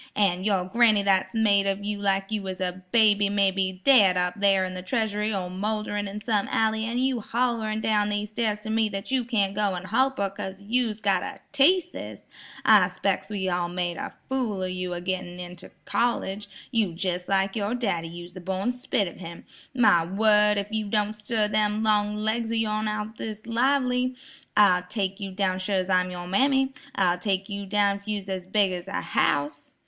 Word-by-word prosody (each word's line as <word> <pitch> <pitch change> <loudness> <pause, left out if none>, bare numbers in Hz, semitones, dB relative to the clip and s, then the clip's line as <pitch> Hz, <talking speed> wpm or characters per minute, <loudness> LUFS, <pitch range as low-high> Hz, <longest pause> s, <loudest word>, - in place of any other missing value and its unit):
"An' 185 -3 +2
your 195 -3 +1
granny 215 0 +4
that's 195 +2 +1
made 200 -3 +3
of 195 +1 -2
you 205 0 -3
like 195 0 0
you 215 -1 -1
was 190 -1 -6
a 185 0 -3
baby 205 -3 +4
may 200 -1 +2
be 190 -1 -2
daid 205 -10 +6
up 180 +2 -1
thar 195 -2 +4
in 185 - -5
the 185 - -6
treasury 210 +1 -1
or 190 -3 -2
moulderin' 205 +1 -2
in 200 +2 -6
some 210 -2 0
alley 220 0 +1
an' 235 +2 -3
you 260 -1 +1
hollerin' 225 -2 -1
down 210 -1 +1
these 210 0 -3
stairs 215 -2 -1
to 220 - -5
me 220 -1 +2
that 195 +4 -6
you 260 -2 +2
can't 210 -5 0
go 200 -2 0
an' 175 - -6
holp 265 +7 +1
her 200 -1 -1
'cause 195 -1 -6
you's 220 +1 -1
got 200 -2 +2
a - - -6
teaseus. 350 +5 +2 0.4
I - - +6
'spec's - - -2
we's 195 -3 -2
all 175 -1 -1
made 175 -1 -3
a - - -6
fool 235 -8 -2
of 185 - -2
you 185 0 -4
a 175 - -5
gettin' 180 -1 -4
you 180 - -6
into 175 0 -11 0.2
college. 210 -4 -1 0.2
You's 200 -8 0
jes' 180 -1 -2
like 195 0 +1
yer 215 +2 -1
daddy; 195 -9 -1
you's 175 +1 -10
the 185 - -9
born 190 +6 -2
spit 245 -5 -1
of - - -9
him. 170 -2 -9 0.3
My 220 -9 +5
word, 210 +3 +4
if 200 +1 -3
you 220 -1 -2
don't 210 0 0
stir 210 0 0
them 210 0 +1
long 210 -1 +2
legs 220 +2 -1
o' 230 - -1
yourn 215 -1 0
out 210 0 -2
o' - - -16
this 215 -1 -6
lively, 250 +1 +1 0.4
I'll 190 -4 +5
take 195 +1 -3
you 200 -1 -5
down 185 -1 -1
sure's 185 0 -1
I'm 185 -1 +2
yer 175 -1 -6
mammy; 265 +7 +2 0.2
I'll 180 -2 +2
take 195 0 -1
yer 200 -1 -5
down 200 0 +2
if 200 +1 -17
you 210 -1 -1
was 195 -1 -8
as 185 -1 -4
big 200 -1 +2
as 180 0 -6
a 200 - -7
house." 145 0 -1
205 Hz, 210 wpm, -25 LUFS, 185-220 Hz, 0.4 s, daid